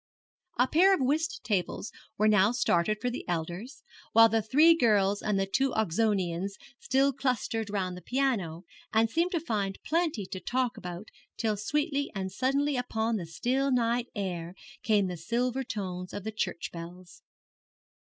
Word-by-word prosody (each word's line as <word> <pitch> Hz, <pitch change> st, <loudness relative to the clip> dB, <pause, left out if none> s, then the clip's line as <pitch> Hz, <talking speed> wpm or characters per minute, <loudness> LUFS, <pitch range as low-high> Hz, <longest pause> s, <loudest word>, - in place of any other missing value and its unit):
A 250 Hz, +2 st, +4 dB
pair 380 Hz, +7 st, +5 dB
of -, -, -5 dB
whist 315 Hz, +9 st, 0 dB
tables 200 Hz, -1 st, -2 dB, 0.3 s
were 215 Hz, -, +3 dB
now 210 Hz, 0 st, +5 dB
started 215 Hz, -3 st, +1 dB
for 245 Hz, +2 st, -1 dB
the 240 Hz, -, -5 dB
elders, 175 Hz, -, -4 dB, 0.3 s
while 225 Hz, 0 st, +8 dB
the 225 Hz, +1 st, +2 dB
three 300 Hz, +10 st, +5 dB
girls 205 Hz, -7 st, +3 dB
and 210 Hz, -2 st, 0 dB
the 195 Hz, -, +1 dB
two 265 Hz, +7 st, +1 dB
Oxonians 195 Hz, -2 st, 0 dB, 0.2 s
still 270 Hz, +2 st, +2 dB
clustered 235 Hz, -4 st, -1 dB
round 190 Hz, -3 st, -2 dB
the 180 Hz, -, -9 dB
piano, 210 Hz, -11 st, -1 dB, 0.3 s
and 225 Hz, +1 st, +3 dB
seemed 335 Hz, +6 st, +1 dB
to 340 Hz, -, +1 dB
find 205 Hz, -10 st, -2 dB
plenty 320 Hz, -, 0 dB
to 185 Hz, -, -6 dB
talk 250 Hz, +6 st, -1 dB
about 180 Hz, 0 st, -7 dB, 0.3 s
till 220 Hz, -2 st, 0 dB
sweetly 285 Hz, -, -1 dB
and 190 Hz, -1 st, -3 dB
suddenly 275 Hz, +5 st, +1 dB
upon 230 Hz, -2 st, -1 dB
the 175 Hz, -4 st, -5 dB
still 260 Hz, +11 st, 0 dB
night 240 Hz, -1 st, +1 dB
air 180 Hz, -3 st, -4 dB, 0.3 s
came 210 Hz, -3 st, +2 dB
the 180 Hz, -1 st, -4 dB
silver 245 Hz, +9 st, -1 dB
tones 185 Hz, -6 st, -5 dB
of 205 Hz, -, -5 dB
the 220 Hz, -, -4 dB
church 210 Hz, -5 st, -3 dB
bells. 175 Hz, +1 st, -10 dB
220 Hz, 165 wpm, -29 LUFS, 190-260 Hz, 0.3 s, while